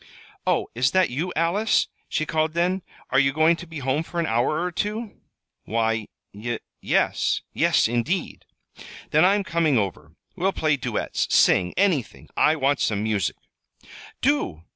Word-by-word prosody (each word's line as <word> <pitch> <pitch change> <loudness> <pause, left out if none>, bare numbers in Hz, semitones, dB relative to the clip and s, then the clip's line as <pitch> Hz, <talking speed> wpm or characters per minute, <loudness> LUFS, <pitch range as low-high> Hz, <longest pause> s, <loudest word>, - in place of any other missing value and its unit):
"Oh, - - +2
is 125 +3 +2
that 185 -7 +3
you, 165 +8 -2
Alice?" 175 +7 +2 0.2
she 155 - -1
called 155 0 0
then. 180 +3 0 0.3
"Are 130 - +4
you 135 0 +3
going 155 +3 +4
to 175 - -10
be 165 -1 -8
home 135 +2 0
for 170 +1 -5
an 170 - +1
hour 120 +5 +1
or 180 +1 -1
two?" 210 +4 -4 0.4
"Why, 115 0 0 0.3
y 115 +3 -4 0.2
yes; - - +1
yes, - - +3
indeed." 120 +11 -2 0.7
"Then 155 +2 +5
I'm 200 +2 +4
coming 170 -6 +1
over. 85 -7 -3 0.2
We'll 190 +1 0
play 155 -2 +1
duets, 135 - -2
sing 90 -1 +4
anything. 180 - 0
I 155 - +4
want 140 -2 +1
some 105 -1 0
music." 105 -4 0 0.9
"Do! 245 - 0
155 Hz, 155 wpm, -24 LUFS, 120-175 Hz, 0.9 s, Then